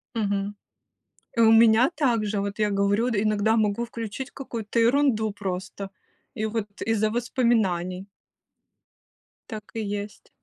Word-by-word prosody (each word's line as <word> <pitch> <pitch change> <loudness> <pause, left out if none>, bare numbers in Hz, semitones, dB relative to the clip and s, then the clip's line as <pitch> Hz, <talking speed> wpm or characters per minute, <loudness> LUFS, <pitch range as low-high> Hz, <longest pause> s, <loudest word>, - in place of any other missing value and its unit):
Мгм. 205 -2 -1 0.8
И - - +5
у 225 -1 +7
меня 225 +3 +6
так 240 -7 +1
же. 205 0 -1
Вот 200 +1 -4
я 210 -1 +2
говорю, 200 +4 +2
д 205 -3 +1
иногда 215 +1 +2
могу 215 +1 +1
включить 230 +2 -6
какую-то 235 -4 -4
ерунду 235 -3 +3
просто, 195 0 -5 0.4
и 215 - -2
вот 220 -1 -2 0.2
из-за 220 -1 +2
воспоминаний. 215 -6 0 1.4
Так 215 -3 -6
и 225 - -3
есть. 205 0 -5
215 Hz, 130 wpm, -25 LUFS, 200-230 Hz, 1.4 s, у